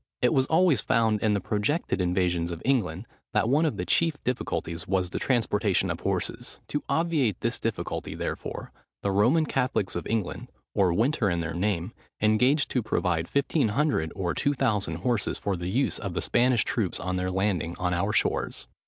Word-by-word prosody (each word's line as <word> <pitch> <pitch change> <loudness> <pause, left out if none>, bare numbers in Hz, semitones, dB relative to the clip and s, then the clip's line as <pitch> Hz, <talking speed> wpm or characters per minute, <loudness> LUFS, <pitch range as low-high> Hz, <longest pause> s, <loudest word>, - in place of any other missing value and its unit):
It 125 - +4
was 130 -1 +3
always 160 - +4
found 110 -2 +2
in 105 -2 +2
the - - +1
projected 105 - -1
invasions 90 -1 +1
of 85 -1 -6
England, 110 -8 0 0.3
that - - +2
one 150 +6 +3
of - - -2
the - - -2
chief 165 -2 +2
difficulties 85 -9 -3
was 90 -2 0
the - - -2
transportation 105 -6 +1
of - - -4
horses. - - -3
To 145 - -1
obviate 155 - +1
this 115 +1 -1
difficulty, 115 -1 -3
therefore, - - -5 0.3
the 100 - +1
Roman 120 +12 +3
Catholics 130 -9 -1
of 85 - -3
England, 110 -4 -2 0.3
or 95 -3 +3
Winter 115 - +2
in 85 -1 0
their 80 0 -3
name, 90 +1 -1 0.3
engaged 125 +8 +3
to 125 - +1
provide 90 -6 0
1500 140 - +1
or 90 -3 -1
2000 115 - 0
horses 110 +6 -1
for 100 -2 -2
the 85 0 -4
use 130 +8 +1
of 95 -5 -5
the - - 0
Spanish 120 -1 +3
troops 105 -7 -1
on 90 0 -2
their 90 0 -1
landing 95 -3 -1
on 90 0 0
our 95 +4 0
shores. - - 0
105 Hz, 180 wpm, -27 LUFS, 90-130 Hz, 0.3 s, It